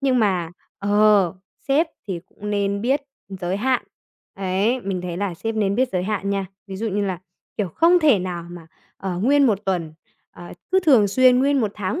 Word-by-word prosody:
Nhưng 265 -2 +2
mà, 185 -7 +1 0.3
ờ, 205 -3 +3 0.3
sếp 295 +5 +3 0.2
thì 185 -4 -4
cũng 210 0 -8
nên 200 -1 0
biết 265 +6 +1 0.3
giới 190 -1 -3
hạn. 255 +4 +1 0.5
Ấy, 195 +6 0
mình 195 -4 -3
thấy 175 -1 -4
là 195 -1 -2
sếp 225 +6 -4
nên 200 -2 +1
biết 255 +4 +1
giới 180 -1 0
hạn 200 0 -2
nha. 195 -1 -1 0.2
Ví 195 -1 -7
dụ 225 +4 -3
như 205 0 -1
là, 190 -3 -2 0.4
kiểu, 205 -3 -1
không 335 - +4
thể 295 - +4
nào 180 -2 -5
mà, 175 -2 -10 0.3
ờ, 185 -2 -4
nguyên 275 +7 +4
1 215 -5 +2
tuần, 175 -5 -2 0.4
ờ, 175 - -11 0.2
cứ 380 - +5
thường 260 - +5
xuyên 255 +4 +5
nguyên 275 +1 +2
1 215 -3 0
tháng 210 - -3
200 Hz, 200 wpm, -22 LUFS, 185-250 Hz, 0.5 s, cứ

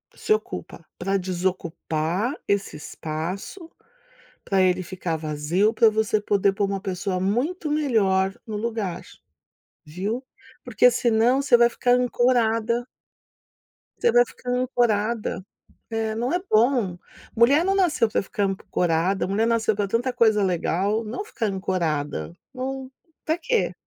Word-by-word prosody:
Se - - -5
ocupa, 430 - -5
pra 195 +2 0
desocupar 180 - -2
esse 200 -4 0
espaço 170 - -6 0.7
pra 195 -1 +1
ele 185 0 +2
ficar 175 -1 -4
vazio 155 +7 0
pra 225 -1 +5
você 215 -1 0
poder 200 -1 +2
pôr 200 0 0
uma 195 0 -2
pessoa 190 -1 -2
muito 285 - -1
melhor 200 -10 +2
no 220 - -5
lugar. 210 -5 -3 0.8
Viu? 200 - -4 0.4
Porque 245 0 +4
senão 240 +2 +2
você 265 -3 +5
vai 235 0 +5
ficar 245 +1 +1
ancorada. 240 -2 +1 1.1
Você 470 - +3
vai 485 +1 +5
ficar 250 - -10
ancorada. 235 -5 0 0.4
É, 225 -1 -2
não 240 +6 -1
é 355 - +2
bom. 220 -5 +2 0.4
Mulher 270 +8 +5
não 385 +2 +1
nasceu 340 - +2
pra - - 0
ficar 200 +1 -1
ancorada, 185 -1 0
mulher 205 +3 +1
nasceu 225 -2 +1
pra 205 0 -1
tanta 235 +6 0
coisa 220 -4 +3
legal, 190 +4 0
não 225 - -5
ficar 245 - -3
ancorada. 155 - -2 0.2
Não, 265 0 -5 0.3
pra 320 +2 0
quê? 485 +4 0
215 Hz, 135 wpm, -24 LUFS, 190-245 Hz, 1.1 s, pra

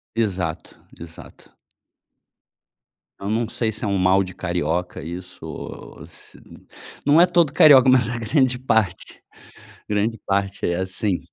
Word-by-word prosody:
Exato, 95 -8 -3 0.2
exato. 80 0 -13 1.7
Eu 100 - -5
não 115 +1 -1
sei 115 0 -2
se 110 +3 -6
é - - -1
um 100 -1 0
mal 95 +1 +3
de 90 -1 -9
carioca 90 -1 -3
isso, 90 +2 -9
o - - -9
o - - -16
ou - - -10
se - - -12 0.7
não 150 +3 +5
é 175 - +7
todo 170 -5 +2
carioca, 135 -4 +7
mas 130 -3 +4
a 120 - -3
grande 130 +2 +1
parte, 110 -7 -1 0.7
grande 105 +2 -1
parte 100 0 -1
é 85 - 0
assim. 95 +1 -2
100 Hz, 150 wpm, -21 LUFS, 90-120 Hz, 1.7 s, é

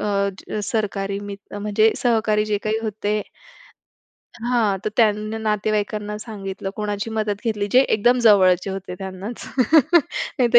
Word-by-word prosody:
अ, 200 0 -2
सरकारी 200 -2 -2
मित्र 205 0 -8
म्हणजे 210 +1 +2
सहकारी 220 -3 +2
जे 210 -1 0
काही 215 +1 0
होते 210 -1 -1 1.3
हां, 215 -6 +2
तर 215 - 0
त्यांनी 215 -1 +2
नातेवाईकांना 210 -1 -1
सांगितलं, 195 -3 -6
कोणाची 210 +1 -3
मदत 215 -2 -1
घेतली, 210 -3 -1
जे 255 - +7
एकदम 240 +1 +3
जवळचे 190 -4 +5
होते 190 -1 -6
त्यांनाच 195 +4 -7 0.9
नाहीतर 240 -2 +6
210 Hz, 125 wpm, -22 LUFS, 200-220 Hz, 1.3 s, जे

